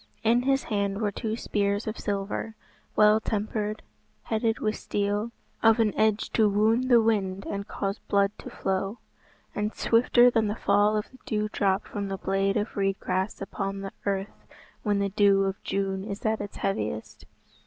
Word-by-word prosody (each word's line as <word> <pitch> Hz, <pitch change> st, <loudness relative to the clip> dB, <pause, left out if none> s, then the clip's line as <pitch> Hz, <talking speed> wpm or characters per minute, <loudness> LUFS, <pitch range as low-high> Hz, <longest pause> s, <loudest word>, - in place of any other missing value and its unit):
In 235 Hz, +2 st, +4 dB
his 270 Hz, +1 st, +1 dB
hand 200 Hz, -2 st, -1 dB
were 210 Hz, -2 st, 0 dB
two 220 Hz, +2 st, -3 dB
spears 205 Hz, -2 st, -1 dB
of 215 Hz, 0 st, -4 dB
silver, 200 Hz, +2 st, -3 dB, 0.4 s
well 210 Hz, 0 st, +6 dB
tempered, 215 Hz, 0 st, -2 dB, 0.4 s
headed 225 Hz, 0 st, 0 dB
with 215 Hz, 0 st, -1 dB
steel, 205 Hz, +2 st, -1 dB, 0.3 s
of 225 Hz, 0 st, +5 dB
an 220 Hz, -2 st, +2 dB
edge 215 Hz, -1 st, +1 dB
to 215 Hz, -2 st, +4 dB
wound 220 Hz, +5 st, +2 dB
the 240 Hz, -2 st, +7 dB
wind 195 Hz, -4 st, 0 dB
and 200 Hz, 0 st, -4 dB
cause 195 Hz, +1 st, -3 dB
blood 200 Hz, 0 st, +3 dB
to -, -, -8 dB
flow, 195 Hz, +3 st, -2 dB, 0.6 s
and 210 Hz, +1 st, -2 dB
swifter 240 Hz, +1 st, +4 dB
than 225 Hz, -2 st, +2 dB
the 205 Hz, -, -1 dB
fall 205 Hz, 0 st, +3 dB
of 210 Hz, -, -4 dB
the 260 Hz, -, -17 dB
dew 215 Hz, 0 st, 0 dB
drop 195 Hz, -1 st, +1 dB
from 205 Hz, -2 st, -4 dB
the 195 Hz, 0 st, -3 dB
blade 195 Hz, +2 st, 0 dB
of 210 Hz, +1 st, -2 dB
reed 195 Hz, -1 st, 0 dB
grass 185 Hz, +2 st, -2 dB
upon 195 Hz, 0 st, -4 dB
the 195 Hz, 0 st, -5 dB, 0.2 s
earth 195 Hz, +1 st, -3 dB, 0.3 s
when 205 Hz, -2 st, +1 dB
the 200 Hz, 0 st, 0 dB
dew 200 Hz, 0 st, +4 dB
of 195 Hz, 0 st, -2 dB
June 195 Hz, -1 st, -1 dB
is 200 Hz, +1 st, -6 dB
at 220 Hz, -1 st, +1 dB
its 205 Hz, -, -7 dB
heaviest. 110 Hz, -, -3 dB
205 Hz, 175 wpm, -27 LUFS, 195-220 Hz, 0.6 s, the